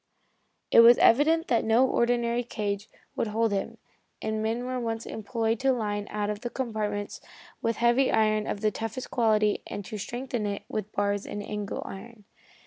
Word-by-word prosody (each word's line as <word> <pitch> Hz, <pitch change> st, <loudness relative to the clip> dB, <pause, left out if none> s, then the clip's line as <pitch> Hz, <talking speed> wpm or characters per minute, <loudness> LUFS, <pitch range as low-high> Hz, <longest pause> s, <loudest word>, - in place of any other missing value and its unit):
It -, -, +7 dB
was 235 Hz, +1 st, +9 dB
evident 320 Hz, +7 st, +4 dB
that 235 Hz, -, +2 dB
no 230 Hz, +4 st, +4 dB
ordinary 235 Hz, 0 st, +1 dB
cage 205 Hz, -3 st, -4 dB, 0.3 s
would -, -, -1 dB
hold 225 Hz, +1 st, +1 dB
him, 195 Hz, -1 st, -2 dB, 0.4 s
and 220 Hz, 0 st, -2 dB
men 225 Hz, +3 st, -1 dB
were 255 Hz, -, -4 dB
at -, -, -3 dB
once 225 Hz, -1 st, -3 dB
employed 225 Hz, 0 st, -2 dB
to 270 Hz, 0 st, +3 dB
line 205 Hz, -4 st, -2 dB
one 210 Hz, -1 st, -2 dB
of 210 Hz, 0 st, -6 dB
the 240 Hz, -, -3 dB
compartments 215 Hz, -5 st, -3 dB, 0.4 s
with 230 Hz, 0 st, 0 dB
heavy 240 Hz, +4 st, +3 dB
iron 215 Hz, -1 st, +2 dB
of 200 Hz, -, -3 dB
the 215 Hz, -1 st, +2 dB
toughest 225 Hz, +4 st, -5 dB
quality 215 Hz, -3 st, +2 dB
and 205 Hz, -, -6 dB
to 215 Hz, -, -6 dB
strengthen 240 Hz, 0 st, -3 dB
it 200 Hz, 0 st, -4 dB
with 215 Hz, -1 st, -4 dB
bars 205 Hz, 0 st, -1 dB
and 205 Hz, -, -5 dB
angle 210 Hz, -1 st, -4 dB
iron. 215 Hz, +2 st, -10 dB
220 Hz, 180 wpm, -27 LUFS, 210-235 Hz, 0.4 s, was